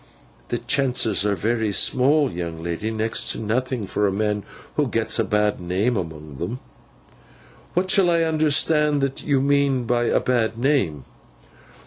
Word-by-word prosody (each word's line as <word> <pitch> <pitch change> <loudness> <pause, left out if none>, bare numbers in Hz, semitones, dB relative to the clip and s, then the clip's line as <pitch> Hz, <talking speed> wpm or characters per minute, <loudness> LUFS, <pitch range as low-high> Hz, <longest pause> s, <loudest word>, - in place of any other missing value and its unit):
'The - - -2
chances 125 -7 +1
are 100 - +1
very 110 0 -1
small, 135 +6 +3
young 85 -2 -5
lady—next 110 +6 -2
to - - -4
nothing—for 110 -2 -1
a - - 0
man 105 +1 -1 0.3
who - - +1
gets - - 0
a - - +3
bad 105 0 0
name 95 +8 0
among 80 -6 -6
them.' 100 - -4 1.2
'What 185 +2 +1
shall 190 -3 +4
I 170 -1 +3
understand 150 -1 +2
that 135 0 -2
you 140 -3 +1
mean 140 -2 +2
by 120 0 0
a - - +2
bad 115 -3 0
name? 120 - 0
115 Hz, 145 wpm, -22 LUFS, 100-140 Hz, 1.2 s, shall